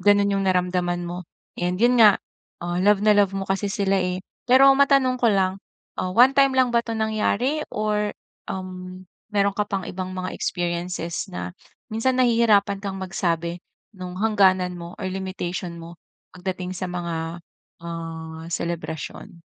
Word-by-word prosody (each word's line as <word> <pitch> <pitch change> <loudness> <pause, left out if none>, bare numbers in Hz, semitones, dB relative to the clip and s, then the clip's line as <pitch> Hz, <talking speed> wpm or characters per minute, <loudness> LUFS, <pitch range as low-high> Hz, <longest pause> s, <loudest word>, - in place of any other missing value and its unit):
gano'n 205 +1 +4
'yong 195 0 0
naramdaman 180 -1 +1
mo 175 +1 -6 0.4
and 180 +2 -1
'yon 245 +1 +4
nga, 210 -3 +8 0.4
ah, 175 0 -2
love 205 +1 +4
na 215 - +6
love 200 -2 +4
mo 195 - -2
kasi 195 +1 0
sila, 195 -2 +1
eh. 180 0 -1 0.3
Pero 270 +2 +8
matanong 270 -2 +4
ko 235 - +4
lang, 190 0 +1 0.4
ah, 185 0 -2
one-time 270 +4 +5
lang 255 -2 +3
ba 235 - +4
'to 225 -1 -3
nangyari? 220 +6 0
Or 210 0 0 0.4
uhm, 185 0 -7 0.3
meron 200 -1 +2
ka 210 - +1
pa'ng 195 -2 -2
ibang 185 0 -5
mga 185 0 -3
experiences 175 0 -3
na, 180 - -5 0.4
minsan 250 +4 +1
nahihirapan 220 -5 +3
ka'ng 195 -1 -4
magsabi, 170 -2 -2 0.4
no'ng 180 -1 -7
hangganan 190 -4 +3
mo 170 0 -9
or - - -4
limitation 185 -2 -4
mo, 170 +1 -11 0.3
pagdating 180 0 -4
sa 185 0 -3
mga, 170 -1 -4 0.4
ah, 165 -1 -6
selebrasyon? 170 +2 -5
185 Hz, 150 wpm, -23 LUFS, 175-210 Hz, 0.4 s, nga